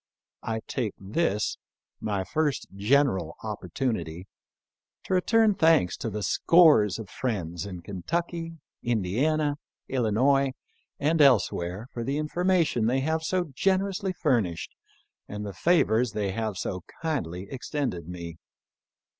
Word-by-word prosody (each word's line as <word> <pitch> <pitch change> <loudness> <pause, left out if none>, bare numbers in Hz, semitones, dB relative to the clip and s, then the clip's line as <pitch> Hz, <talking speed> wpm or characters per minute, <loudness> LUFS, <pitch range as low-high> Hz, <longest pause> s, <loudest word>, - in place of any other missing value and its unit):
I 110 0 -3
take 115 -7 -2
this, 105 - -1 0.4
my 100 -3 -1
first 150 +5 -1
general 100 - +2
opportunity, 95 -4 -3 0.8
to - - -3
return 220 +3 +4
thanks 160 - +4
to 115 - -3
the 105 0 -4
scores 150 - +5
of 110 -3 -7
friends 95 -6 -3
in 90 -3 -7
Kentucky, 165 - -3 0.2
Indiana, 140 +8 0 0.3
Illinois, 130 +3 +2 0.5
and 155 +2 +2
else 130 -8 +5
where 90 +5 -4
for 120 - -3
the 135 +4 -1
information 165 -6 +1
they 130 +3 +2
have 160 +3 0
so 175 -1 -1
generously 195 - +1
furnished 120 - 0 0.5
and 105 0 -5
the 100 - -5
favors 120 - +2
they 100 -2 -1
have 110 -1 -3
so 95 0 -3 0.2
kindly 95 - -2
extended 125 - -3
me. 85 -2 -7
120 Hz, 120 wpm, -27 LUFS, 100-155 Hz, 0.8 s, scores